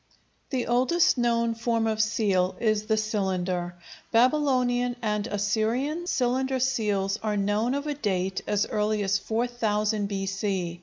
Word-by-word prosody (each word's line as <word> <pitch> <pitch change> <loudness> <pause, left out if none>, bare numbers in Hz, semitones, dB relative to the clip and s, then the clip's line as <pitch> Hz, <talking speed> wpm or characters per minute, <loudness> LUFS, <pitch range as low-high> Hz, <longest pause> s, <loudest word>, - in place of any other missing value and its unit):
The 255 -3 -1
oldest 255 +8 +3
known 235 -1 +1
form 230 0 0
of 220 -1 +1
seal 200 -4 +1
is 215 -2 0
the 220 -1 +2
cylinder. 185 -4 -1 0.4
Babylonian 245 -1 +2
and 210 -1 -1
Assyrian 235 - -1
cylinder 260 -1 0
seals 210 -6 0
are 215 -1 -1
known 210 +5 +1
of 285 +1 -3
a 300 - -1
date 190 -8 -2
as 205 0 +1
early 210 -1 0
as 195 0 +1
4000 220 -2 -1
B.C. 195 -3 -2
220 Hz, 135 wpm, -26 LUFS, 200-245 Hz, 0.4 s, oldest